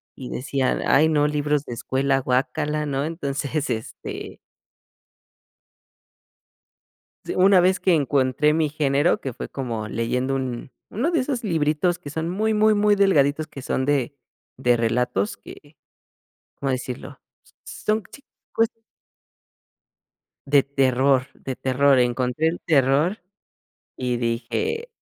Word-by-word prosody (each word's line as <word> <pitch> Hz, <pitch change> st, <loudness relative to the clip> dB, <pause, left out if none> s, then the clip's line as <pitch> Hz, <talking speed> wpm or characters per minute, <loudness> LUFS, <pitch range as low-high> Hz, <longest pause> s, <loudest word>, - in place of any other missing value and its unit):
y 130 Hz, -, -8 dB
decía: 130 Hz, 0 st, -1 dB
"Ay 155 Hz, +3 st, +5 dB
no, 150 Hz, -2 st, +2 dB
libros 150 Hz, -1 st, 0 dB
de 120 Hz, -, -6 dB
escuela, 135 Hz, +3 st, 0 dB
guácala", 150 Hz, +4 st, -1 dB
¿no? 140 Hz, +1 st, -1 dB
Entonces, 150 Hz, -2 st, -3 dB
este. 110 Hz, 0 st, -6 dB, 2.9 s
S -, -, -4 dB
una 190 Hz, +1 st, +6 dB
vez 185 Hz, +2 st, +3 dB
que 185 Hz, -, +3 dB
encontré 140 Hz, +1 st, +2 dB
mi 160 Hz, -1 st, +1 dB
género, 145 Hz, +2 st, +1 dB
que 135 Hz, -, -5 dB
fue -, -, -7 dB
como 115 Hz, -5 st, -4 dB
leyendo 125 Hz, +4 st, -1 dB
un 130 Hz, -1 st, -4 dB, 0.2 s
uno 275 Hz, -, -1 dB
de 330 Hz, -, +2 dB
esos 255 Hz, -2 st, -2 dB
libritos 165 Hz, 0 st, +1 dB
que 145 Hz, -, -9 dB
son 160 Hz, +3 st, -3 dB
muy, 215 Hz, +4 st, 0 dB
muy, 215 Hz, +1 st, +4 dB
muy 210 Hz, 0 st, +3 dB
delgaditos, 155 Hz, -6 st, +3 dB
que 140 Hz, -, -10 dB
son 130 Hz, +1 st, -1 dB
de 140 Hz, -1 st, 0 dB, 0.4 s
de 125 Hz, -2 st, +3 dB
relatos 115 Hz, -3 st, 0 dB
que, 145 Hz, +9 st, -14 dB, 0.8 s
¿cómo 135 Hz, -1 st, -2 dB
decirlo? 130 Hz, +2 st, -5 dB, 0.2 s
S -, -, -26 dB, 0.3 s
son 215 Hz, -1 st, +1 dB
chicos. 230 Hz, -1 st, -4 dB, 1.8 s
De 140 Hz, -1 st, +5 dB
terror 135 Hz, -1 st, +2 dB
de 130 Hz, -2 st, -7 dB
terror 135 Hz, +1 st, +3 dB
encontré 125 Hz, +5 st, +1 dB
el 165 Hz, +2 st, -2 dB
terror 150 Hz, -, +2 dB, 0.8 s
y 125 Hz, -1 st, -1 dB
dije, 120 Hz, -, -2 dB
140 Hz, 125 wpm, -23 LUFS, 130-160 Hz, 2.9 s, una